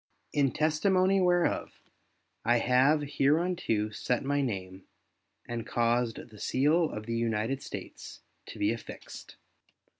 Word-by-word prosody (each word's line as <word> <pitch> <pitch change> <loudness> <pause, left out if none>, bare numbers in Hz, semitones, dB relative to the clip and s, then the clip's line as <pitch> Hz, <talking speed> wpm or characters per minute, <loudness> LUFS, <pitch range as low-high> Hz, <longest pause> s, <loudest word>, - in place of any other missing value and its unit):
In 140 -3 +2
testimony 185 +5 +2
whereof, 175 -1 +1 0.6
I 120 +2 +3
have 130 +5 +3
hereunto 145 -6 +1
set 120 +4 -1
my 145 +1 +1
name, 95 -6 -4 0.6
and 120 -1 -4
caused 120 0 0
the 105 - -13
seal 155 - +2
of 105 0 -6
the 115 0 -3
United 115 +3 -1
States - - -8 0.3
to - - -9
be - - +1
affixed. - - -10
130 Hz, 120 wpm, -29 LUFS, 115-155 Hz, 0.6 s, I